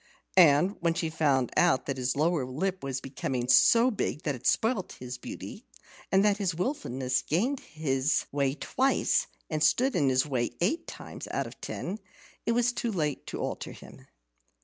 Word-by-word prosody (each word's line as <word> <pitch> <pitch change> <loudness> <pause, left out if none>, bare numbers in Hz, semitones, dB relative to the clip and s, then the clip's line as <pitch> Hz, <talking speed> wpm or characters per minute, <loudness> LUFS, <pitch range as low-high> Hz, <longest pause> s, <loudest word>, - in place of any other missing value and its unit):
And 175 +2 +5
when 170 -1 +1
she 165 -1 -2
found 140 -6 +1
out 175 -7 +3
that 135 -1 -3
his 125 0 -1
lower 155 0 +1
lip 180 +9 -3
was 135 -1 -2
becoming 130 -2 -3
so 235 - +6
big 190 -7 -3
that 145 - 0
it 125 - -4
spoilt 220 -4 +1
his 125 0 -8
beauty, - - -8 0.5
and 195 +1 +4
that 205 -1 +3
his 190 -5 -1
wilfulness 130 - -1
gained 240 - 0
his 140 -2 -1
way 140 -1 0
twice 265 - +1 0.2
and 155 -2 -3
stood 250 - +3
in 140 - +3
his 130 +1 +2
way 125 -5 -1
eight 320 - 0
times - - -8
out - - -1
of - - -11
ten, 195 +5 -5 0.5
it 230 - +3
was 245 +1 +2
too 235 -1 -2
late 150 -7 -2
to - - -5
alter - - -4
him. - - -14
155 Hz, 175 wpm, -28 LUFS, 135-195 Hz, 0.5 s, so